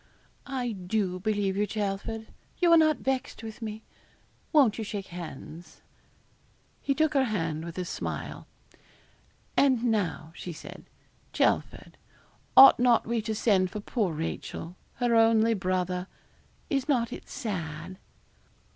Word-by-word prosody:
'I 255 -3 -2 0.2
do 185 -3 0
believe 205 -1 0
you, 205 +1 +1
Chelford; 210 +2 -3 0.3
you 345 -1 +3
are 335 - +8
not 310 -2 +4
vexed 260 -3 -3
with 220 +1 -8
me. 220 0 -6 0.7
Won't 270 -9 +4
you - - -2
shake 205 -2 -5
hands?' 170 -1 -9 1.0
He 275 - 0
took 315 0 +2
her 270 -2 +3
hand 165 -8 -2
with 170 +1 -8
a 180 - -2
smile. - - -5 1.1
'And 260 -4 +3
now,' 190 -8 -1
said 175 -3 -9 0.5
she, - - -8
'Chelford, - - -1 0.6
ought 270 - +10
not 245 -2 +4
we 230 0 -1
to 220 0 -3
send 195 -4 +2
for 210 - -5
poor 205 -2 -1
Rachel: 165 +2 -5 0.2
her 240 -1 +1
only 225 0 +5
brother? 185 -2 -1 0.6
Is 275 0 -1
not 240 -5 +1
it - - -10
sad?' 185 - -5
215 Hz, 135 wpm, -28 LUFS, 185-240 Hz, 1.1 s, ought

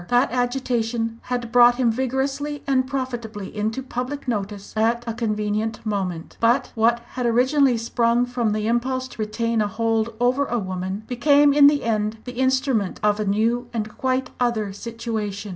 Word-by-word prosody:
That 245 +1 +3
agitation 240 -2 -1
had 245 -2 -3
brought 245 0 +6
him 245 -2 +2
vigorously 270 +4 -2
and 260 -2 +1
profitably 240 -7 -5
into 220 +5 -2
public 255 +3 -5
notice 205 -3 -4
at 230 +2 +1
a 230 - -3
convenient 215 -1 -2
moment. 185 -6 -3
But 235 +2 +2
what 235 +1 +2
had 250 -1 -2
originally 255 +2 +3
sprung 235 +1 +1
from 245 -3 -1
the 215 0 -1
impulse 255 +3 0
to 230 - -7
retain 230 +1 0
a 210 - +1
hold 225 +1 -1
over 255 +3 +2
a 240 - -1
woman, 190 0 -4
became 285 +4 +4
in 285 0 +7
the 290 0 +3
end 215 -1 -1
the 250 0 -7
instrument 260 -6 +1
of 210 0 +2
a 215 - -1
new 225 +5 +1
and 215 -1 -3
quite 260 -1 -1
other 225 -5 0
situation. 220 -2 -4
235 Hz, 165 wpm, -23 LUFS, 215-255 Hz, -, in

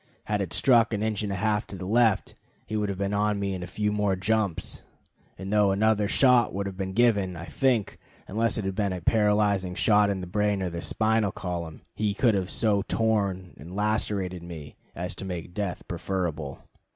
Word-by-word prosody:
Had 105 -1 -1
it 95 - -3
struck 120 -4 +4
an 105 - -2
inch 110 -2 -1
and 105 -2 -2
a - - -1
half 105 +2 0
to - - -8
the 90 0 -6
left, 110 +1 +2 0.3
he 110 - -5
would 105 -1 0
have 100 - -3
been 100 +1 -1
on 105 0 +1
me 100 -1 -1
in 95 - -5
a 90 - -5
few 105 +3 -1
more 105 -2 +1
jumps; 100 -2 -1 0.6
and 95 +3 -5
though 105 -1 +4
another 105 +1 +2
shot 125 -3 +4
would 100 0 -2
have 100 -1 -5
been 95 0 -4
given, 100 -5 +2
I 85 0 -7
think, 115 - 0 0.3
unless 115 +3 0
it 105 - -2
had 95 - -1
been 100 -1 0
a 90 - -5
paralyzing 105 -2 +2
shot 105 0 +4
in 100 -1 -1
the 90 - -5
brain 105 +1 0
or 85 -2 -3
spinal 110 -1 +1
column, 85 -3 -5
he 105 -2 -1
could 115 0 +3
have 95 -2 -1
so 105 -3 +1
torn 100 -5 0
and 85 +5 -10
lacerated 100 -4 -1
me 80 -4 -9 0.2
as 90 +1 -4
to - - -6
make 90 -2 -6
death 100 -3 -4
preferable. 85 -6 -3
100 Hz, 205 wpm, -27 LUFS, 90-105 Hz, 0.6 s, struck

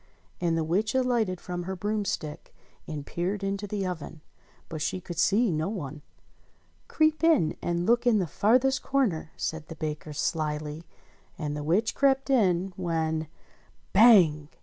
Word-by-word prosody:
And 170 -2 +1
the 165 - 0
witch 200 +9 0
alighted 235 -8 +1
from 175 -1 -5
her 190 +1 -4
broomstick 200 -6 -3 0.3
and 150 -3 -5
peered 190 +6 -3
into 200 +1 -2
the 200 -1 -2
oven: 160 -3 -6 0.5
but 160 -2 -6
she 185 - -1
could 175 -1 -7
see 205 +5 +3
no 155 +2 -1
one. 150 -8 -6 0.9
"Creep 310 0 +1
in 300 - +4
and 175 0 -1
look 240 +3 +2
in 230 -3 +5
the 190 - +1
farthest 250 - +2
corner," 225 - 0
said 160 -1 -4
the 165 - -8
baker 155 0 -5
slyly, 150 +1 -3 0.5
and 150 -2 -3
the 150 - -4
witch 190 +9 +1
crept 270 0 +2
in 190 -6 +2
when 160 -3 -1 0.7
Bang 180 -9 +6
180 Hz, 150 wpm, -27 LUFS, 160-215 Hz, 0.9 s, Bang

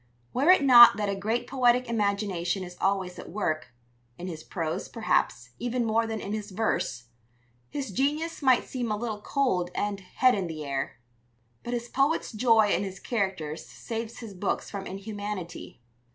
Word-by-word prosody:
Were 280 +7 +2
it 370 -5 +7
not 240 -5 +9
that 210 -1 -1
a 200 - 0
great 220 +5 -1
poetic 250 -1 +2
imagination 200 -4 0
is 180 0 -9
always 190 -2 0
at - - -9
work 155 -7 -2 0.5
in 175 - -7
his 160 -4 -6
prose, 165 -4 -3
perhaps, 120 - 0
even 245 0 -1
more 225 +1 +2
than 220 -1 -3
in 205 - -5
his 215 -1 -4
verse 185 - -2 0.6
his 275 -6 -4
genius 300 - -1
might 260 -3 +4
seem 245 -4 -3
a 210 - 0
little 215 -2 -4
cold 205 -10 0
and 205 -1 -1
head 250 +7 +2
in 195 -3 -1
the 155 -2 -6
air. 135 -1 -3 0.6
But 240 +1 -3
his 235 0 -4
poet's 275 +6 +1
joy 220 -2 +4
in - - +1
his 190 -1 -6
characters 190 -9 -2
saves 230 0 -6
his 220 -4 -8
books 190 +1 -2
from 195 -1 -5
inhumanity. 200 - -6
210 Hz, 170 wpm, -27 LUFS, 185-240 Hz, 0.6 s, not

